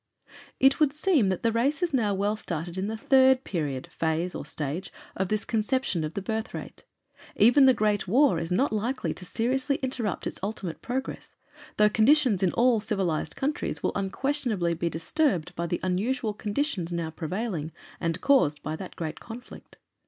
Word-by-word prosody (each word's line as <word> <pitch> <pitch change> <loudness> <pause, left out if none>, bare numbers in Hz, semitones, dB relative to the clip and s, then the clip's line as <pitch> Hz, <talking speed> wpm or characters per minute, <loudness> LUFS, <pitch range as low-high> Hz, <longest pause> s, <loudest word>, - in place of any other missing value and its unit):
It 270 +3 +5
would 295 -3 +3
seem 305 - +2
that 185 - -2
the 230 - +3
race 275 +9 +1
is 340 -4 0
now 215 -6 +2
well 205 +2 0
started 170 -4 -5
in 190 +1 -2
the 220 +1 -3
third 265 +2 +4
period, 145 -7 -3
phase, 165 +2 -1
or - - -5
stage 155 +5 -4 0.2
of 190 - -1
this 210 +1 -1
conception 230 - 0
of 155 +1 -4
the 200 - -3
birth 220 +1 -3
rate. - - -8 0.5
Even 250 +5 +6
the 260 - +7
Great 210 -2 +1
War 250 - +4
is 165 +1 -4
not 220 +8 +2
likely 235 +5 -1
to - - -11
seriously 260 - 0
interrupt 245 -6 -2
its - - -4
ultimate 195 -4 -4
progress, 260 +2 -5 0.4
though 210 - +6
conditions 220 -1 +4
in 185 -3 +3
all 240 -1 +4
civilized 190 -8 -1
countries 290 +2 -2
will - - 0
unquestionably 205 - 0
be 170 +1 -1
disturbed 170 - 0
by 170 0 -2
the 175 - -1
unusual 215 +5 0
conditions 205 - -2
now 170 -2 -2
prevailing 165 0 -3 0.3
and 165 +1 -2
caused 155 - +3
by 155 +2 -3
the 185 +3 -7
great 160 -2 -5
conflict. 240 +2 -11
210 Hz, 175 wpm, -27 LUFS, 175-260 Hz, 0.5 s, the